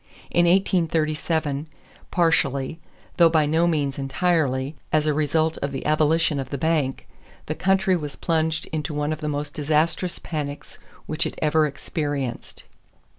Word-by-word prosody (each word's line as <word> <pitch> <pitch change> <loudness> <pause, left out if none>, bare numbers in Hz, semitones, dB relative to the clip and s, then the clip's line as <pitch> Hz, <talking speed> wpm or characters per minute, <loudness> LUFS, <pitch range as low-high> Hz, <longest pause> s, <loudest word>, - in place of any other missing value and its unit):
In 175 0 +4
1837, 160 -4 +1 0.4
partially, 160 -4 +1 0.4
though 170 -1 +7
by 160 -2 +3
no 160 +3 +2
means 145 -5 0
entirely, 140 -1 0 0.2
as 155 -1 +2
a 155 - +2
result 155 +2 +1
of 140 - -2
the 135 - -5
abolition 155 0 +2
of 135 -2 -4
the 140 - -3
bank, 150 -3 0 0.4
the - - -2
country 190 0 +2
was 150 -5 -4
plunged 160 -2 0
into 155 -1 -2
one 150 +1 0
of 155 - -7
the 150 - -2
most 145 0 -3
disastrous 155 +4 0
panics 145 -3 -6 0.3
which 155 +1 -1
it - - -8
ever 155 0 +3
experienced. 140 -3 -4
155 Hz, 145 wpm, -24 LUFS, 145-165 Hz, 0.4 s, though